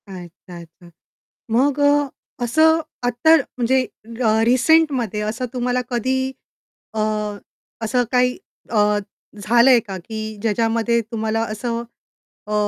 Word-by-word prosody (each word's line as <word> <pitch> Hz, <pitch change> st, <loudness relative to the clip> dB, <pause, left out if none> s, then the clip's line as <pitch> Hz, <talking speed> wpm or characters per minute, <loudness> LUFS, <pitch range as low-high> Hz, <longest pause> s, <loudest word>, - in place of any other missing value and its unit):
अच्छा, 180 Hz, -1 st, -11 dB
अच्छा. 170 Hz, +1 st, -17 dB, 0.6 s
मग 270 Hz, +5 st, +2 dB
अ, 285 Hz, 0 st, +3 dB, 0.4 s
असं 315 Hz, +7 st, +4 dB, 0.3 s
आत्ता 245 Hz, +7 st, +4 dB, 0.2 s
म्हणजे 260 Hz, +2 st, +2 dB, 0.4 s
अ, 220 Hz, 0 st, +3 dB
रिसेंटमध्ये 255 Hz, -4 st, +2 dB
असं 220 Hz, +4 st, -3 dB
तुम्हाला 250 Hz, 0 st, 0 dB
कधी 255 Hz, +2 st, 0 dB, 0.8 s
अ, 220 Hz, -, -3 dB, 0.8 s
असं 230 Hz, +3 st, +1 dB
काही 250 Hz, 0 st, +2 dB, 0.3 s
अ, 210 Hz, -2 st, +2 dB, 0.4 s
झालंय 235 Hz, +4 st, +5 dB
का 195 Hz, -1 st, -5 dB
की 215 Hz, +1 st, -6 dB
ज्याच्यामध्ये 230 Hz, +1 st, +1 dB
तुम्हाला 220 Hz, 0 st, -1 dB
असं 230 Hz, +2 st, -3 dB, 0.6 s
अ 210 Hz, -, -4 dB
235 Hz, 110 wpm, -20 LUFS, 215-255 Hz, 0.8 s, झालंय